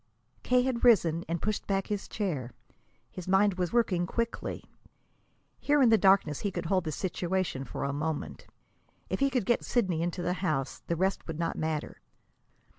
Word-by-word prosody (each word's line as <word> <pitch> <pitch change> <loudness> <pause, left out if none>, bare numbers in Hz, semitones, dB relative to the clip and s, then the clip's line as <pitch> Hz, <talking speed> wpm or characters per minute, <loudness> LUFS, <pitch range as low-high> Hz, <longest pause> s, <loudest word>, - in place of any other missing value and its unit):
K. 250 0 +3
had 250 -2 -1
risen 175 -9 +4
and 170 0 -2
pushed 215 -1 -2
back 195 -1 0
his 205 -2 -3
chair. 150 - -3 0.6
His 180 -1 -8
mind 190 0 +3
was 180 -2 0
working 185 -7 +1
quickly. 230 +4 -3 1.0
Here 290 0 +2
in 255 -4 +6
the 225 - +7
darkness 190 -7 +4
he 205 - -1
could 175 -2 -5
hold 185 +1 +1
the 155 - -2
situation 175 -3 -2
for - - -5
a 140 - -1
moment. 150 +1 -4 0.6
If - - -1
he 275 0 +3
could 250 -6 0
get 240 - +2
Sidney 185 -9 0
into 175 +1 -2
the 180 - 0
house, 155 -8 -1
the 170 - 0
rest 190 +3 -1
would 165 -2 -5
not 165 0 -1
matter. 155 -1 -3
185 Hz, 180 wpm, -29 LUFS, 165-210 Hz, 1.0 s, the